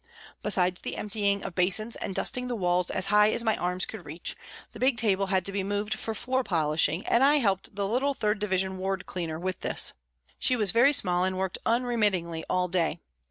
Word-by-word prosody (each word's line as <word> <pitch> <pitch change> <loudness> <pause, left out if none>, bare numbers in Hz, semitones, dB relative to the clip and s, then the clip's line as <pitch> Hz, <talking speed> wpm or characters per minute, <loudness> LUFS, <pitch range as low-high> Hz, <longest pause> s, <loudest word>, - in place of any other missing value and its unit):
Besides 180 -3 +1
the - - -5
emptying 200 -1 -1
of - - -5
basins 190 +6 +2
and 195 - -5
dusting 250 -1 0
the 245 - -2
walls 180 -3 +1
as 190 - +1
high 210 0 +6
as 235 - 0
my 220 -2 +2
arms 180 +1 -1
could 220 -5 -9
reach, 160 +3 -4 0.4
the - - -12
big 255 -1 +2
table 200 -3 +1
had 190 -2 0
to 200 - +1
be 195 -1 -2
moved 205 +2 -2
for 220 +1 -5
floor 260 +3 0
polishing, 155 -2 +1
and 235 - +3
I 285 +2 +6
helped 200 -8 0
the 200 -1 -1
little 270 +6 0
3rd 210 -2 -1
Division 190 -2 -1
ward 190 0 -3
cleaner 165 -3 -4
with 185 0 -3
this. - - +1 0.5
She 255 - +3
was 210 -6 +1
very 240 +5 +5
small 180 -10 +2
and 185 0 -1
worked 190 -1 -2
unremittingly 210 -9 0
all 180 0 +1
day. 170 -2 -1
195 Hz, 210 wpm, -27 LUFS, 180-220 Hz, 0.5 s, high